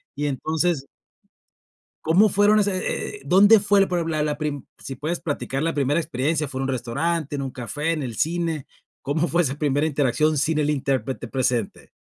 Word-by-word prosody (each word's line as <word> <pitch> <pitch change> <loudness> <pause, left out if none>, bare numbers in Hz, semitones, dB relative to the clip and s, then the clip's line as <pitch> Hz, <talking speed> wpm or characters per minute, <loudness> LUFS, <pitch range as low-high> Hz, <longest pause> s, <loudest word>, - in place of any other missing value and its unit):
y 145 - -2
entonces 155 +2 -1 1.2
¿Cómo 185 +7 +5
fueron 205 +2 +4
ese 200 - -2
eh? - - -17
¿dónde 205 +4 +6
fue 200 0 +3
la 195 - +3
prim 175 -2 -1
la 155 -2 0
la 150 -1 -1
prim? 150 -3 -4
si 135 - -7
puedes 155 +7 -3
platicar 140 -3 -3
la 165 0 0
primera 145 +2 +1
experiencia, 150 +2 -1
¿fue 130 0 -6
en - - -1
un 135 - -2
restaurante, 140 +5 -2
en 140 - -3
un 135 -1 -4
café, 140 +7 -3
en 155 -3 -2
el 120 -4 -5
cine? 165 -2 -1 0.3
¿Cómo 155 +4 0
fue 170 +4 +2
esa 135 -4 -1
primera 145 0 0
interacción 150 +1 +1
sin 155 +2 +1
el 150 -1 +1
intérprete 135 -3 -1
presente? 125 -4 -2
150 Hz, 190 wpm, -23 LUFS, 135-170 Hz, 1.2 s, dónde